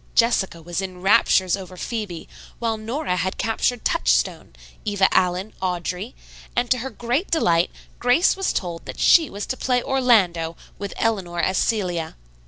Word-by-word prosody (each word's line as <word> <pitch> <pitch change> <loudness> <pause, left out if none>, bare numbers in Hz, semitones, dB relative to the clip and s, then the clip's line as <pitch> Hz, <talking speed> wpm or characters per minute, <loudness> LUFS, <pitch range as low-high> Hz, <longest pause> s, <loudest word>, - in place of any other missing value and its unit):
Jessica 190 -8 +2
was 175 +3 -3
in 185 -1 -7
raptures 190 -2 +4
over 185 -2 -9
"Phebe," 205 -6 -5 0.3
while 230 -1 -1
Nora 225 -1 -2
had 185 +2 -2
captured 225 +2 -1
"Touchstone," - - +1 0.3
Eva 205 -2 +3
Allen, 185 +3 +1
"Audrey," 180 +4 -3 0.4
and, 245 0 0
to 255 - +4
her 265 +3 -4
great 245 - -2
delight, 175 - +2 0.3
Grace 245 +9 +4
was 385 0 0
told 170 -3 -4
that - - -7
she 325 -4 +5
was 205 +1 -5
to - - -3
play 250 -1 +1
"Orlando," 195 - +2 0.2
with 200 -1 -5
Eleanor 190 -7 -1
as 185 +2 +1
"Celia." 180 -7 -1
195 Hz, 155 wpm, -23 LUFS, 180-240 Hz, 0.4 s, she